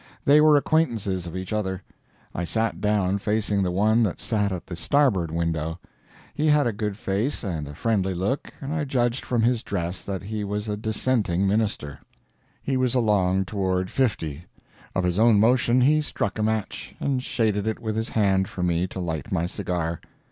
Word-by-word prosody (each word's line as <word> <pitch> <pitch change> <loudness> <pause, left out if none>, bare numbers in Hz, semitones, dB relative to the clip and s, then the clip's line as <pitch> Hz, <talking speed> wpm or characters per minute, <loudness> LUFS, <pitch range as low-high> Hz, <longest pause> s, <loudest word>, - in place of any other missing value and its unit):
They 145 +2 +6
were 155 -1 +6
acquaintances 115 - 0
of 85 +2 -5
each 95 +2 -5
other. 95 -3 -2 0.5
I 90 - -3
sat 110 +7 -1
down 100 -2 +1
facing 105 -1 0
the 90 - +1
one 105 +5 +3
that 105 -6 0
sat 105 -3 0
at 90 -2 -5
the 90 - -6
starboard 110 - +2
window. 80 0 -2 0.6
He 155 +2 0
had 150 -1 +4
a 120 - 0
good 105 -1 -3
face, 105 +8 -1
and 80 -8 -3
a 75 - -9
friendly 95 -3 0
look, 100 +11 -2
and 140 +1 -4
I 155 -1 -1
judged 125 -3 0
from 120 -3 0
his 120 -1 +2
dress 90 -4 -3
that 95 -2 -5
he 105 +1 -4
was 105 +1 -3
a 105 - -1
dissenting 105 -3 0
minister. 100 -9 -1 0.6
He 135 -1 0
was 130 -1 +1
along 95 -5 +2
toward 95 -2 -1
fifty. 85 - -1 0.5
Of 95 - +1
his 90 +2 0
own 115 -2 +5
motion 120 +2 +4
he 150 +4 +4
struck 110 -8 -3
a - - +1
match, 110 -1 -2
and 135 -2 0
shaded 110 -5 0
it 110 - -1
with 110 -3 -3
his 110 +2 -2
hand 95 -3 +2
for 90 - -5
me 90 +1 +1
to 95 - -7
light 80 -6 -4
my 85 - +1
cigar. 85 -3 -3
105 Hz, 190 wpm, -25 LUFS, 90-115 Hz, 0.6 s, They